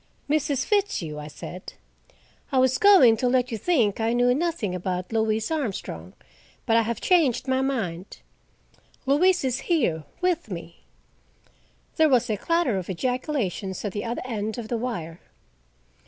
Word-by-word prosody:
"Mrs. 285 -2 0
Fitzhugh," 385 - -1
I 150 - -7
said. 175 +4 -9 0.8
"I 270 - +1
was 260 0 +3
going 365 - +7
to 250 - 0
let 250 0 +1
you 225 - -2
think 235 - +1
I 225 +1 +1
knew 245 +1 +3
nothing 310 - -1
about 180 +2 -3
Louise 220 +2 0
Armstrong, 195 - -4 0.5
but 225 - +2
I 230 - +5
have 230 0 -3
changed 310 - +2
my 260 0 +1
mind. 205 -10 -3 0.9
Louise 350 +7 +3
is 260 0 0
here, 205 - +1 0.2
with 360 -9 0
me." 170 -2 -9 1.1
There 315 -2 +5
was 245 -4 +2
a - - +1
clatter 335 - +1
of 180 - -8
ejaculations 215 - -2
at 205 - -2
the 205 +2 -4
other 235 0 -4
end 220 -3 -3
of 225 -2 -6
the 235 - -1
wire. 175 -9 -4
235 Hz, 155 wpm, -25 LUFS, 195-275 Hz, 1.1 s, going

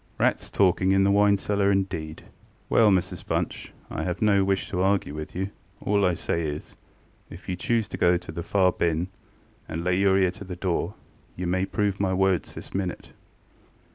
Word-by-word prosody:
Rats - - +1
talking 95 0 +3
in 95 0 +4
the 100 - +3
wine 100 0 +4
cellar 100 0 +1
indeed! 90 -5 -2 0.5
ŌĆØ - - 0
ŌĆ£Well, 110 -2 +6
Mrs 90 - -5
Bunch, - - -3 0.2
IŌĆÖve 90 +3 -3
no 100 -2 +4
wish 95 0 0
to 90 - 0
argue 95 -5 +1
with 75 0 -7
you: 95 +2 -2 0.3
all 100 0 +1
I 90 -1 +2
say 85 - -1
is, 75 -2 -5 0.5
if 85 - -12
you 90 - -1
choose 115 +3 0
to - - -5
go 90 0 +4
to 90 - -9
the 85 - -5
far 95 +1 +3
bin, 85 +1 0 0.6
and 80 +1 -3
lay 90 0 +2
your 95 -1 +4
ear 95 -2 +3
to - - -10
the 90 -2 -6
door, 90 +1 -2 0.4
you 90 - -4
may 95 +2 0
prove 100 0 -1
my 95 -2 +1
words 95 -2 +1
this - - -9
minute. 95 -2 -3
95 Hz, 195 wpm, -26 LUFS, 90-100 Hz, 0.6 s, ŌĆ£Well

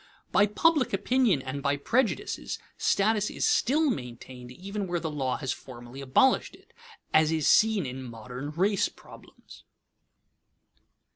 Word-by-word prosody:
By 200 +2 +4
public 285 +5 +2
opinion 205 - +2
and 135 +2 -5
by 140 0 0
prejudices, 230 - -1 0.2
status 210 +1 +1
is - - -2
still 315 - +2
maintained 125 - -8
even 195 +7 -5
where 175 -1 -1
the 160 -2 -4
law 135 -4 -1
has 135 -3 -3
formally 125 0 -9
abolished 135 - +2
it, - - -24 0.4
as 155 0 +4
is 160 -3 0
seen 215 -5 +4
in 130 +1 -6
modern 125 +3 -7
race 190 +6 +1
problems. - - -16
160 Hz, 135 wpm, -27 LUFS, 130-210 Hz, 0.4 s, By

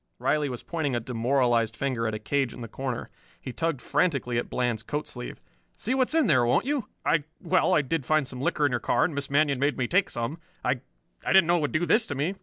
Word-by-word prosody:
Riley 150 -2 +1
was 125 -2 -6
pointing 150 -6 -2
a - - +1
demoralized 120 -1 +1
finger 125 -4 -1
at 110 - -2
a - - -4
cage 135 +2 -1
in - - -9
the 115 - -5
corner. 130 +1 -4 0.3
He 130 - -7
tugged 165 -4 -2
frantically 135 -9 +1
at - - -5
Bland's 120 -3 -1
coat 150 +1 -3
sleeve. 125 -1 -7 0.4
"See 240 - -1
what's 265 +3 +1
in 320 -3 +4
there, 135 - +4
won't 120 - +2
you? 275 -6 -1 0.2
I 150 -3 +2
well, 185 0 +2
I 150 - +3
did 145 +2 -1
find 155 0 +2
some 125 -1 -7
liquor 145 +1 +1
in 145 - +2
your 120 - 0
car, - - +2
and 160 - -2
Miss 140 -1 -4
Manion 140 -1 +2
made 140 -1 +1
me 125 -2 0
take 185 +6 +2
some. 120 +8 -4 0.3
I 125 0 +1 0.4
I - - +1
didn't 190 -3 +7
know 175 +1 +3
it - - -1
would 145 - -1
do 155 +2 +1
this 220 +5 +3
to 145 - -3
me. 150 +8 0
140 Hz, 250 wpm, -27 LUFS, 125-165 Hz, 0.4 s, didn't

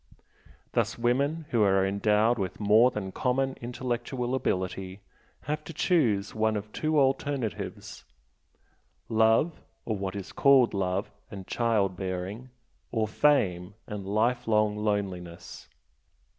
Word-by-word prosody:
Thus - - 0
women 140 +7 0
who 115 - +2
are 95 -2 +4
endowed 105 +4 +2
with 95 -2 -3
more 110 +4 +5
than 105 -6 -5
common 135 +4 0
intellectual 120 +1 -3
ability 95 -5 -2 0.4
have 150 +2 -3
to 165 - -8
choose 115 - +1
one 110 0 +1
of 105 +1 -7
two 155 -1 +1
alternatives 135 - -2 1.1
love, 115 +8 +3 0.2
or 110 - -1
what 95 0 -4
is 100 -2 -6
called 135 -3 +5
love, 95 0 -1 0.2
and 95 -2 -8
child 105 -5 +1
bearing, 95 +6 -5 0.4
or 110 -2 0
fame, 100 -8 +1
and 105 -3 -6
lifelong 110 0 +1
loneliness. 95 -5 -4
110 Hz, 115 wpm, -28 LUFS, 100-125 Hz, 1.1 s, more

